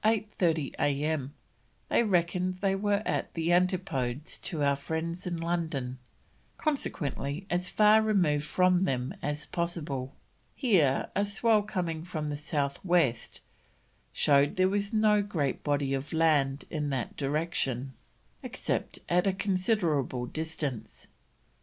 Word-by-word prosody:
30 190 -9 +1
A.M., 145 -1 0 0.6
they - - +4
reckoned 180 -3 +1
they 195 0 +1
were 205 +1 +1
"at - - -1
the 165 0 0
Antipodes 165 -8 0
to 165 -6 -3
our 140 0 +3
friends 160 +5 -4
in 175 -1 -2
London, 160 -7 -2 0.6
consequently 165 - -2
as 180 +1 0
far 215 +1 +5
removed 180 -9 +2
from 180 +3 +3
them 130 -5 -1
as 150 +1 -2
possible." 155 -7 -3 0.4
Here 170 - +2
a 200 - +2
swell 210 +2 +3
coming 180 -6 -3
from 155 -4 -4
the - - -2
south 145 -2 -2
west 170 -10 +1 0.7
showed 140 0 +3
there 185 0 +4
was 200 0 -1
no 215 -2 +4
great 160 -10 -2
body 145 -2 0
of 135 +2 -3
land 150 -4 +2
in 150 -3 -2
that 130 -3 -3
direction, 135 -3 -1 0.5
except - - -3
at 180 +2 +2
a 195 - +3
considerable 180 - 0
distance. 155 -3 -5
165 Hz, 130 wpm, -29 LUFS, 140-185 Hz, 0.7 s, far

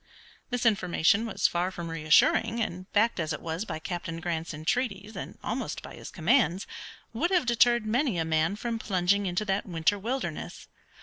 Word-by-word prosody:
This 245 -1 -2
information 200 0 +3
was 215 - -2
far 175 +1 0
from 175 -2 -6
reassuring, 165 +8 +3
and, 185 -3 -4
backed 220 0 +2
as 160 -1 -1
it - - -4
was 165 +5 -4
by 160 - -4
Captain 165 0 -5
Grant's 165 -1 -3
entreaties 200 +6 -2
and - - -7
almost - - -3
by - - -9
his - - -9
commands, 190 - +2 0.5
would 305 +10 0
have 360 -6 +2
deterred 240 -1 +4
many 235 - +1
a 165 - 0
man 160 +3 +1
from 230 +1 -3
plunging 195 0 +1
into 180 +4 -1
that 195 +1 -1
winter 170 +3 +1
wilderness. 250 +6 -4
195 Hz, 175 wpm, -28 LUFS, 170-230 Hz, 0.5 s, deterred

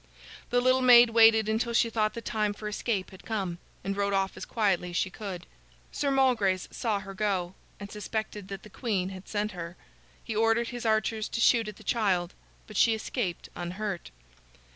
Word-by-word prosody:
The 245 0 +2
little 255 +1 +3
maid 245 -2 +8
waited 225 -1 +6
until 225 +2 0
she 230 0 +3
thought 215 0 0
the 230 - -6
time 210 -1 0
for 210 - -6
escape 210 -2 -2
had 190 0 -14
come, 190 -6 -3 0.2
and 195 0 -2
rode 200 0 0
off 195 0 0
as - - -7
quietly 195 -5 0
as 175 - -7
she 190 - 0
could. 185 -3 -7 0.5
Sir 285 - -1
Malgrace 240 -9 +2
saw 215 -4 -1
her 195 0 -8
go, 190 -3 -1 0.3
and 200 -1 -8
suspected 210 -1 -4
that 195 -1 -7
the 210 - -12
queen 195 -7 -1
had 190 0 -10
sent 210 0 -2
her. 175 -2 -7 0.5
He 225 - -5
ordered 225 +2 +2
his 240 -2 -4
archers 220 0 0
to - - -3
shoot 230 -1 +4
at 210 - -6
the - - -15
child, 190 -6 0 0.3
but 215 - -8
she 225 -2 +5
escaped 215 -5 -4
unhurt. 185 +2 -4
210 Hz, 190 wpm, -28 LUFS, 190-225 Hz, 0.5 s, maid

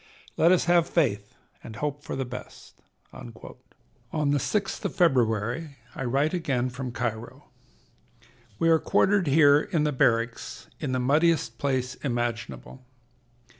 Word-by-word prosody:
Let 170 - +4
us 185 - +3
have 170 -1 +3
faith, 105 -11 0 0.3
and 110 - -9
hope 145 +3 -3
for - - -5
the 135 - -2
best." 125 +1 -11 0.3
On - - -9
the 145 +4 -5
6th 200 - -2
of - - -3
February 130 - +1 0.2
I 135 - -5
write 140 +6 +1
again 135 -8 -1
from 130 0 -5
Cairo: 120 -2 -5 1.1
"We 165 - +1
are 160 -1 +5
quartered 195 0 +2
here 145 0 +5
in 165 -4 -1
the 150 - +1
barracks, 115 -2 0
in 140 -4 -3
the 130 - 0
muddiest 145 -2 +1
place 130 -2 -1
imaginable. 120 0 -4
135 Hz, 135 wpm, -26 LUFS, 120-160 Hz, 1.1 s, are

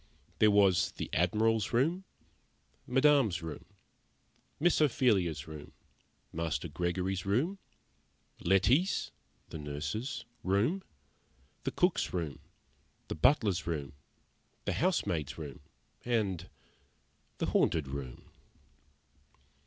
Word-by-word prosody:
There 110 - +6
was 100 -3 +4
the - - -6
Admiral's 110 +6 +2
room, 165 +10 +1 0.8
Madame's 130 - +3
room, 80 -2 -7 0.9
Miss 170 +1 +3
Ophelia's 100 - +2
room, 75 -2 -9 0.6
Master 80 -2 -2
Gregory's 90 +4 -2
room, 135 - 0 0.8
Letty's 115 - +2 0.4
(the 80 - -7
nurse's) 75 - -4 0.2
room, 105 - +1 0.8
the - - 0
cook's - - +1
room, 80 -6 -3 0.7
the - - -2
butler's 105 - +3
room, 75 -5 -3 0.7
the - - 0
housemaid's 90 - 0
room 75 -5 -7 0.4
and 100 -7 -1 0.9
the - - -1
Haunted 80 -4 +2
Room. 65 -2 -6
95 Hz, 90 wpm, -32 LUFS, 80-125 Hz, 0.9 s, There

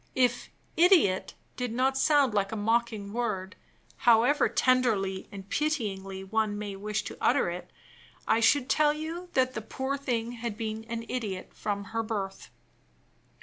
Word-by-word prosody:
If 245 -2 +1 0.3
"idiot" 330 - +4 0.2
did 250 -2 -3
not 260 +3 +1
sound 280 -3 +3
like 200 -2 +1
a - - -3
mocking 220 -1 0
word, 210 -5 -2 0.4
however 245 +5 +4
tenderly 220 -7 +1
and 195 -1 -9
pityingly 200 -12 -2
one 215 +1 0
may 205 -1 -5
wish 210 +1 -3
to - - -7
utter - - +3
it, - - -7 0.6
I 225 - +4
should 255 +3 +4
tell 300 0 +3
you 325 +4 -6
that 255 -1 +2
the 220 - -4
poor 265 +5 -3
thing 240 -4 -2
had 235 -3 -5
been 220 -1 -4
an 230 0 -5
idiot 205 -7 -4
from 200 -1 -3
her 225 - +1
birth. 200 -3 -4
225 Hz, 150 wpm, -28 LUFS, 205-255 Hz, 0.6 s, idiot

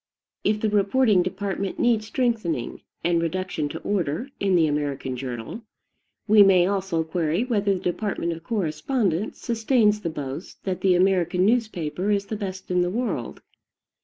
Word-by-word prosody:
If 210 0 +1
the 220 - +1
reporting 210 0 +3
department 195 +1 -3
needs 225 -3 +2
strengthening 220 - -1 0.2
and 170 -1 +2
reduction 170 -3 -2
to - - -6
order 190 - -1
in 195 -2 +2
the 165 -2 +5
American 145 -3 -2
journal, 125 - -6 0.7
we 215 0 +7
may 190 -3 +6
also 190 -4 0
query 165 +3 0
whether 205 -5 +1
the - - -4
department 180 -1 -2
of 165 -1 -6
correspondence 190 - -1
sustains 225 -2 +2
the 170 - -2
boast 145 +2 -7
that 185 -2 -3
the 185 -2 +4
American, 180 -1 +2
newspaper 200 -6 0
is 200 -1 +1
the 215 - -4
best 190 -3 -6
in 180 0 +3
the 175 - +1
world. 205 - -3
190 Hz, 155 wpm, -24 LUFS, 165-210 Hz, 0.7 s, we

